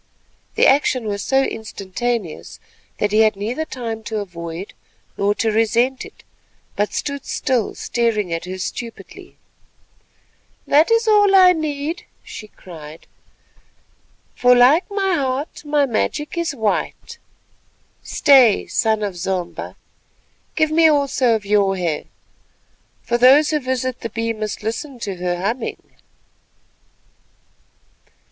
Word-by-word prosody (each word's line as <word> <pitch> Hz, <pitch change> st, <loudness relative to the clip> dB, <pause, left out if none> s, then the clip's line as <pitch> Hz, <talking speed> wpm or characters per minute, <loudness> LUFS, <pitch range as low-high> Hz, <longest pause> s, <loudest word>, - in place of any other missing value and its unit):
The -, -, +4 dB
action 265 Hz, -3 st, +3 dB
was 200 Hz, -1 st, -3 dB
so 270 Hz, +5 st, +2 dB
instantaneous 220 Hz, -3 st, -4 dB, 0.4 s
that 205 Hz, -, 0 dB
he 215 Hz, -, +3 dB
had 215 Hz, -1 st, +4 dB
neither 230 Hz, +10 st, -3 dB
time 230 Hz, -6 st, -5 dB
to 220 Hz, -, -3 dB
avoid 175 Hz, -2 st, -6 dB, 0.4 s
nor 205 Hz, +1 st, +1 dB
to 215 Hz, +2 st, 0 dB
resent 235 Hz, +4 st, +1 dB
it, -, -, -16 dB, 0.5 s
but 205 Hz, +1 st, 0 dB
stood 280 Hz, -2 st, -4 dB
still 250 Hz, -5 st, -1 dB
staring 215 Hz, -7 st, -1 dB
at 165 Hz, +1 st, -3 dB
her 185 Hz, +1 st, -6 dB
stupidly. 230 Hz, +5 st, -8 dB, 1.3 s
"That 305 Hz, +3 st, +4 dB
is 460 Hz, 0 st, +2 dB
all 410 Hz, -2 st, +5 dB
I 365 Hz, -1 st, +7 dB
need," 310 Hz, +1 st, -4 dB, 0.2 s
she 215 Hz, -, -9 dB
cried, 160 Hz, -6 st, -12 dB, 1.3 s
"for 250 Hz, 0 st, +4 dB
like 265 Hz, -, +5 dB
my 390 Hz, -2 st, 0 dB
heart 275 Hz, -1 st, -2 dB
my 295 Hz, -1 st, +2 dB
magic 275 Hz, +6 st, -2 dB
is 340 Hz, -4 st, -2 dB
white. 220 Hz, -4 st, -3 dB, 0.8 s
Stay—son 225 Hz, -5 st, +3 dB
of 200 Hz, -3 st, -3 dB
Zomba, 180 Hz, 0 st, -4 dB, 0.8 s
give 315 Hz, -1 st, +2 dB
me 325 Hz, +1 st, +5 dB
also 275 Hz, -5 st, +2 dB
of 215 Hz, -2 st, -4 dB
your 200 Hz, -1 st, +2 dB
hair, 170 Hz, -4 st, -2 dB, 1.0 s
for 240 Hz, 0 st, -1 dB
those 275 Hz, +5 st, +6 dB
who 305 Hz, -, +1 dB
visit 255 Hz, -1 st, -3 dB
the 230 Hz, -, -4 dB
Bee 230 Hz, +1 st, -2 dB
must 215 Hz, -1 st, -5 dB
listen 245 Hz, +5 st, -4 dB
to 195 Hz, -4 st, -4 dB
her 175 Hz, 0 st, -2 dB
humming." 225 Hz, +6 st, -4 dB
235 Hz, 125 wpm, -20 LUFS, 205-280 Hz, 1.3 s, I